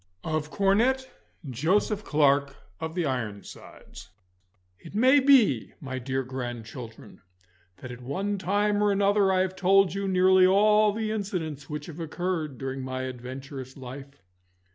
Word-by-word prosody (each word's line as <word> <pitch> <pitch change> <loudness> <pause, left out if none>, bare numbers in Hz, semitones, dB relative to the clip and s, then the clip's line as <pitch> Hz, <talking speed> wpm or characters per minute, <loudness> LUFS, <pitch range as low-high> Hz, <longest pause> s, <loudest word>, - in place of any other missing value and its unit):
Of 155 -1 -2
Cornet 230 +9 +2 0.4
Joseph 185 - 0
Clarke 140 -3 +2 0.2
of 160 0 -5
the 175 -3 0
Ironsides 115 -7 -7 0.7
It - - -12
may 260 +6 +5
be, 255 - +4
my 130 -2 -5
dear 130 +1 -2
grandchildren, 120 -2 -8 0.6
that 125 - -9
at 125 0 -10
one 195 +10 -3
time 205 +2 +1
or 205 0 +3
another 200 0 +3
I 185 -1 +2
have 185 0 -2
told 195 -1 +3
you 195 0 -3
nearly 185 0 +5
all 210 +2 +4
the 215 +1 -3
incidents 170 -9 -4
which 150 -1 -5
have 165 -1 -10
occurred 165 -3 -3
during 135 +1 -5
my 130 0 -4
adventurous 130 +1 -8
life. 135 0 -10
160 Hz, 140 wpm, -26 LUFS, 130-200 Hz, 0.7 s, may